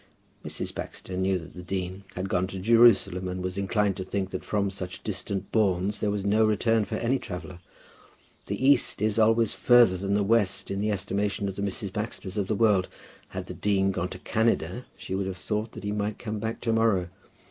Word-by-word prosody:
Mrs. - - -4
Baxter 95 - -7
knew 95 +1 +1
that 85 -1 -10
the 90 - -8
dean 95 +1 -4
had 95 +1 -3
gone 90 0 0
to 95 - -6
Jerusalem, 100 -3 +4
and 90 0 -4
was 90 0 -3
inclined 100 0 +1
to 95 - -3
think 95 0 -3
that - - -4
from 100 -2 0
such 90 -1 -5
distant 100 -1 -3
bournes 100 -2 +1
there 105 - 0
was 100 -1 -2
no 105 +2 +4
return 110 0 +2
for 110 - -4
any 120 +4 +1
traveller. 90 -1 -7 0.9
The 130 - -2
east 140 -3 +4
is 110 +1 +1
always 115 0 +4
further 100 +1 +5
than 100 +2 -1
the 100 - +2
west 105 -3 +2
in 100 0 -2
the 105 - 0
estimation 100 +1 -1
of 95 - -4
the 100 - -4
Mrs. 100 0 -1
Baxters 105 -3 -4
of 100 -3 -1
the 110 - 0
world. 100 -4 +3 0.4
Had - - -6
the - - -7
dean 95 -1 +1
gone 90 -1 -2
to - - -7
Canada, 115 +2 0
she - - -6
would 95 0 -1
have 95 -1 -4
thought 105 +3 -3
that - - -9
he 105 - -2
might 105 0 -2
come 110 -2 -4
back 110 +1 -4
to 115 -2 0
morrow. 110 -6 +2
100 Hz, 210 wpm, -27 LUFS, 95-110 Hz, 0.9 s, further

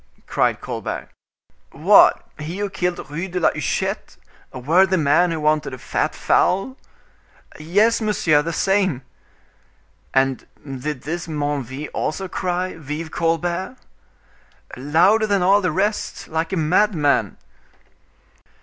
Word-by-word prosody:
cried - - 0
Colbert, - - -5 0.6
"what, - - +5
he 160 +5 -5
who 205 -1 -3
killed 180 -5 -2
Rue 170 +5 -3
de 180 0 -3
la 170 - +3
Huchette, - - -3 0.3
a - - -9
worthy 185 +9 +3
man 160 +3 +3
who 165 -1 -2
wanted 150 -3 0
a - - -12
fat - - -2
fowl?" 195 +8 +1 0.8
"Yes, 205 +10 +2
monsieur; 170 -8 +2
the 165 +3 -3
same." 190 -6 +1 1.1
"And 135 -1 0 0.2
did 135 0 -5
this 170 +3 -4
Menneville 145 -2 -3
also 190 +4 -2
cry, 180 -1 -3
'Vive 155 +1 -6
Colbert'?" 170 - -1 1.0
"Louder 170 - +3
than 200 -3 +1
all 200 +3 +4
the 180 -3 0
rest; 205 +6 -2
like 160 +2 -2
a 190 - -1
madman." 160 -2 +2
165 Hz, 120 wpm, -21 LUFS, 150-190 Hz, 1.1 s, what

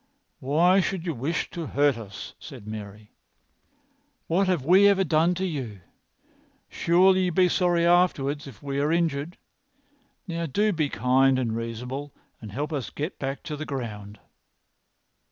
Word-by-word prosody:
"Why 170 +8 +3
should 185 -1 -2
you 170 - -1
wish 140 +6 -2
to 170 -3 -5
hurt 145 0 +2
us?" 105 -4 -9
said - - -11
Mary. 105 0 -8 1.1
"What 185 +4 +1
have 175 -8 0
we 190 +5 +6
ever 195 -1 +4
done 165 +1 +2
to 190 +2 -2
you? 130 - -5 0.9
Surely 185 +2 +3
you 180 - 0
will - - -9
be 185 -1 +5
sorry 175 -2 +2
afterwards 150 -5 +2
if 130 -4 -13
we 140 -1 -2
are 145 +2 +1
injured. 165 -1 -1 0.9
Now 170 -1 -3
do 205 +9 +1
be 155 -4 0
kind 130 +1 +3
and 115 -4 -1
reasonable 125 +5 -5 0.3
and 110 -3 -8
help 145 +8 -3
us 135 -8 -3
to - - -12
get 150 +6 -4
back 135 0 -4
to 150 - -5
the 150 - -5
ground." 105 -8 -6
145 Hz, 160 wpm, -26 LUFS, 130-175 Hz, 1.1 s, we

